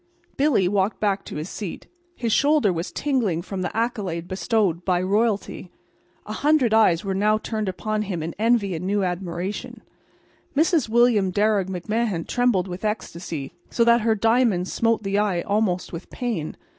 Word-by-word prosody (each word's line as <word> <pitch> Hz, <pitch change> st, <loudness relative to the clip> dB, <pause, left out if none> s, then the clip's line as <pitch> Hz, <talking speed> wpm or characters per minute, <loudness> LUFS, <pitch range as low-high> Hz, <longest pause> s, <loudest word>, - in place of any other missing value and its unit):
Billy 270 Hz, -10 st, +3 dB
walked 195 Hz, +2 st, 0 dB
back 200 Hz, -2 st, 0 dB
to -, -, -8 dB
his 155 Hz, +2 st, -4 dB
seat. 195 Hz, -3 st, -6 dB, 0.3 s
His 230 Hz, -3 st, -1 dB
shoulder 285 Hz, -9 st, +3 dB
was 170 Hz, +2 st, -4 dB
tingling 225 Hz, -, 0 dB
from 190 Hz, 0 st, -5 dB
the 185 Hz, -, -3 dB
accolade 195 Hz, -8 st, -2 dB
bestowed 185 Hz, -2 st, 0 dB
by 180 Hz, -1 st, +1 dB
royalty. 205 Hz, 0 st, 0 dB, 0.6 s
A 215 Hz, -, -5 dB
hundred 280 Hz, -3 st, +2 dB
eyes 200 Hz, -6 st, +4 dB
were 195 Hz, -, -1 dB
now 210 Hz, +3 st, +2 dB
turned 215 Hz, -2 st, -3 dB
upon 215 Hz, +3 st, -2 dB
him 185 Hz, -6 st, -3 dB
in 165 Hz, +1 st, -4 dB
envy 225 Hz, -4 st, +2 dB
and 165 Hz, +1 st, -4 dB
new 200 Hz, 0 st, +1 dB
admiration. 180 Hz, +1 st, -4 dB, 0.7 s
Mrs. 315 Hz, -5 st, +3 dB
William 230 Hz, -4 st, +4 dB
Darragh 205 Hz, -1 st, +1 dB
McMahan 190 Hz, 0 st, -2 dB
trembled 245 Hz, -7 st, +1 dB
with 180 Hz, +2 st, -7 dB
ecstasy, 170 Hz, -8 st, -4 dB, 0.2 s
so 235 Hz, -, +2 dB
that 235 Hz, 0 st, +5 dB
her 220 Hz, 0 st, +2 dB
diamonds 225 Hz, -4 st, +2 dB
smote 230 Hz, -1 st, +1 dB
the 195 Hz, +1 st, 0 dB
eye 195 Hz, -5 st, +1 dB
almost 200 Hz, -4 st, -1 dB
with 170 Hz, +2 st, -7 dB
pain. 225 Hz, -11 st, -4 dB
205 Hz, 165 wpm, -23 LUFS, 180-225 Hz, 0.7 s, that